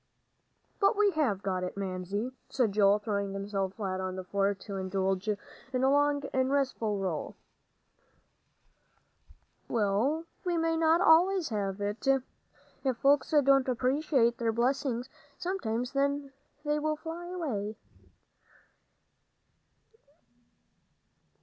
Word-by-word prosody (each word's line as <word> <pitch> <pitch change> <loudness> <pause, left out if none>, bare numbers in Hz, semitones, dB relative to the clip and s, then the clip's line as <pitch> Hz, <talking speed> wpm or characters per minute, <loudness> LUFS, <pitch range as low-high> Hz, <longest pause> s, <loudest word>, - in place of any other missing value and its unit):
"But 400 +1 +3
we 410 -1 +4
have 255 - 0
got 185 -2 -1
it, 180 - -5
Mamsie," 195 +4 -3 0.2
said 245 -6 +1
Joel, 200 0 +4
throwing 200 -2 -2
himself 195 -1 -3
flat 190 -3 -3
on 185 0 -3
the 185 - -5
floor, 200 +2 0
to 195 0 -7
indulge 190 +1 -1
in 210 - +1 0.5
a 265 - +4
long 290 0 +2
and 260 0 +2
restful 255 -7 0
roll. 185 -5 -3 2.3
"Well, 230 +9 +1 0.2
we 350 -2 0
may 330 0 +1
not 325 +1 +3
always 360 0 +5
have 200 -3 -2
it. 205 +6 -3 0.8
If 260 -3 0
folks 275 +1 +3
don't 275 -3 +4
appreciate 255 -1 +2
their 230 -1 +1
blessings, 250 +1 0 0.3
sometimes 250 - -2
they 280 0 0 0.5
fly 325 +3 -3
away." 250 - -3
240 Hz, 110 wpm, -30 LUFS, 200-290 Hz, 2.3 s, always